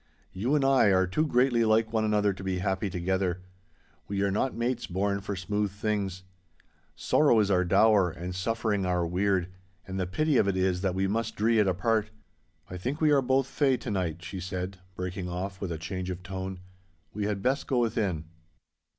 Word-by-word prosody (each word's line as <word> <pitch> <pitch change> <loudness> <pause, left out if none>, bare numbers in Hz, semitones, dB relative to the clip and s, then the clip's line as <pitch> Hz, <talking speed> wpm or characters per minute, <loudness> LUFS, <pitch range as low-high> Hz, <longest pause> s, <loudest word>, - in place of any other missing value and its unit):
You 120 +10 0
and 140 -2 +2
I 135 -3 +5
are 95 -2 +4
too 155 - 0
greatly 125 -3 +3
like 110 0 +2
one 110 -1 +2
another 105 -2 +2
to 95 - -10
be 95 -1 -1
happy 95 +2 -1
together. 90 0 -1 0.6
We 100 0 -1
are 100 - +1
not 125 +6 0
mates 120 +1 -1
born 100 +2 -1
for 100 0 -4
smooth 105 +3 -1
things. 100 -2 -3 0.7
Sorrow 140 -7 +3
is 100 -1 +2
our 90 -1 +3
dower 100 +1 +4
and 85 +2 -6
suffering 105 +1 -1
our 90 -1 +1
weird, 90 +1 0 0.4
and 95 0 -4
the 90 - -1
pity 150 - +1
of 100 - +3
it 95 -1 0
is 95 -1 +1
that 95 -2 0
we 95 +1 +1
must 110 +4 -1
dree 110 +1 +2
it 105 - +3
apart. 105 +4 +1 0.6
I 90 - -7
think 130 - -3
we 155 -1 +3
are 140 -2 +5
both 130 +1 +2
"fey" 135 -1 +1
to 120 - -5
night,' 85 -4 -2
she 95 +2 -6
said, 90 +1 -5 0.2
breaking 90 0 -4
off 95 +2 -5
with 95 -3 -3
a 80 - -3
change 90 +3 -5
of 90 0 -5
tone. 95 -1 -5 0.5
'We 105 0 -2
had 100 -2 -2
best 135 +3 0
go 130 - 0
within. 105 -9 0
100 Hz, 200 wpm, -28 LUFS, 90-110 Hz, 0.7 s, I